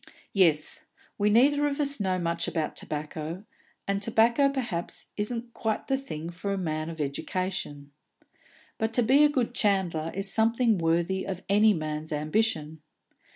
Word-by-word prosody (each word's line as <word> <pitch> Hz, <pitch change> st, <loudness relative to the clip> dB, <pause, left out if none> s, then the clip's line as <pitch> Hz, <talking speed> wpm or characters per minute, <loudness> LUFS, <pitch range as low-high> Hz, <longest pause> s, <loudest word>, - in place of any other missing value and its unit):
"Yes; 165 Hz, -6 st, +2 dB, 0.3 s
we 205 Hz, +1 st, +3 dB
neither 285 Hz, +7 st, +4 dB
of 285 Hz, +1 st, -3 dB
us 280 Hz, -2 st, 0 dB
know 190 Hz, -2 st, 0 dB
much 170 Hz, -1 st, -1 dB
about 160 Hz, -3 st, -2 dB
tobacco, 155 Hz, +4 st, -5 dB, 0.4 s
and 200 Hz, 0 st, 0 dB
tobacco 230 Hz, +6 st, +3 dB
perhaps 240 Hz, -11 st, -4 dB
isn't 230 Hz, +3 st, -4 dB
quite 220 Hz, -1 st, -2 dB
the 270 Hz, -, +2 dB
thing 170 Hz, -, -6 dB
for 180 Hz, +3 st, -4 dB
a 195 Hz, -, -1 dB
man 155 Hz, -3 st, -2 dB
of 165 Hz, -1 st, -8 dB
education. 145 Hz, -1 st, -3 dB, 0.9 s
But 220 Hz, +1 st, -1 dB
to 245 Hz, -, +4 dB
be 270 Hz, +6 st, +5 dB
a 280 Hz, -5 st, +2 dB
chandler 190 Hz, -9 st, 0 dB
is 195 Hz, +1 st, 0 dB
something 225 Hz, -1 st, +3 dB
worthy 170 Hz, +3 st, +1 dB
of 190 Hz, -1 st, -5 dB
any 210 Hz, +1 st, +5 dB
man's 155 Hz, 0 st, -4 dB
ambition. 155 Hz, 0 st, 0 dB
195 Hz, 150 wpm, -27 LUFS, 160-230 Hz, 0.9 s, be